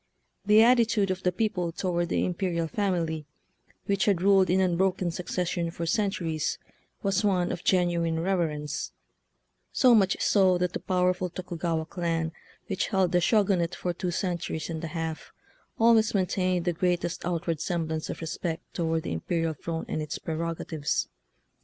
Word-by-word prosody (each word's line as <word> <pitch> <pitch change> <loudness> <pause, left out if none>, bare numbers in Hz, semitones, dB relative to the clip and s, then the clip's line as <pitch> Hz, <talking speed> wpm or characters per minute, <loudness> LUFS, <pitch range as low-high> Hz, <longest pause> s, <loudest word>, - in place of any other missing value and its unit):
The 215 +1 +7
attitude 230 -5 +4
of 185 0 -3
the 180 - +1
peo 215 +5 +1
ple 180 -5 -3
toward 175 0 -1
the - - +1
imperial 175 -2 -1
family, 165 -5 -1 0.6
which 200 -1 +1
had 200 -4 +3
rilled 195 -1 +5
in 185 +2 +3
unbroken 185 0 +1
succession 175 0 -2
for 165 0 -5
cen 200 +4 +1
turies, 165 -5 -2 0.5
was 195 +1 +1
one 185 -4 +2
of 175 - -5
genuine 170 -3 +2
reverence 165 -5 -1 0.4
— - - -49
so 255 -3 +7
much 200 -4 +4
so 190 -3 +4
that 180 0 -1
the - - -2
powerful 180 0 0
Tokugawa 170 -2 -3
clan, 165 -2 -2 0.3
which 195 -4 -1
held 190 -3 +1
the 175 - +3
Shogunate 190 -4 +2
for 180 - -2
two 180 +1 -3
centuries 175 -2 -2
and 160 0 -5
a - - -2
half, 160 0 -5 0.5
always 225 -1 +4
maintained 185 -2 +1
the 175 - +1
greatest 175 0 -1
outward 170 -2 -2
semblance 160 -2 -2
of - - -5
respect 165 0 -3
toward 165 -2 -1
the - - -3
imperial 165 - -1
throne 165 +2 -5
and 155 - -2
its 150 0 -4
prerog 165 +1 -3
atives. 150 -2 -2
175 Hz, 165 wpm, -27 LUFS, 165-190 Hz, 0.6 s, The